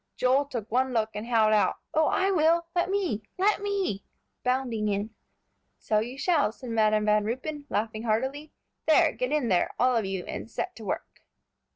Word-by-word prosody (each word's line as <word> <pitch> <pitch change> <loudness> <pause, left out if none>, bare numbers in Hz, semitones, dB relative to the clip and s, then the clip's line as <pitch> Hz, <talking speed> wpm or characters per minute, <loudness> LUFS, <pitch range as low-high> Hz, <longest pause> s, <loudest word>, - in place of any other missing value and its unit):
Joel 260 +3 +3
took 235 -6 -6
one 255 +2 +1
look, 220 -1 0
and 210 +2 -5
howled 220 -3 +3
out, 210 - +3 0.2
"Oh, 310 -1 +3
I 385 +1 +2
will; 335 -1 +3
let 350 +1 +1
me; 375 - 0 0.2
let 405 +2 +2
me!" 395 - -1 0.4
bounding 250 -4 0
in. 205 +2 -1 0.7
"So 215 - +1
you 240 +5 -4
shall," 300 - +2
said 245 +1 -9
Madam 215 -1 +2
Van 210 0 +3
Ruypen, 280 +6 -4
laughing 220 +1 -2
heartily. 265 +7 -1 0.4
"There, 320 0 +5
get 250 +1 -3
in 295 -6 +1
there, 180 -2 +2
all 250 0 +3
of 225 -3 +1
you, 190 -2 -3
and - - -6
set 370 +8 -4
to 225 - -9
work." 190 - -5
250 Hz, 185 wpm, -27 LUFS, 215-305 Hz, 0.7 s, There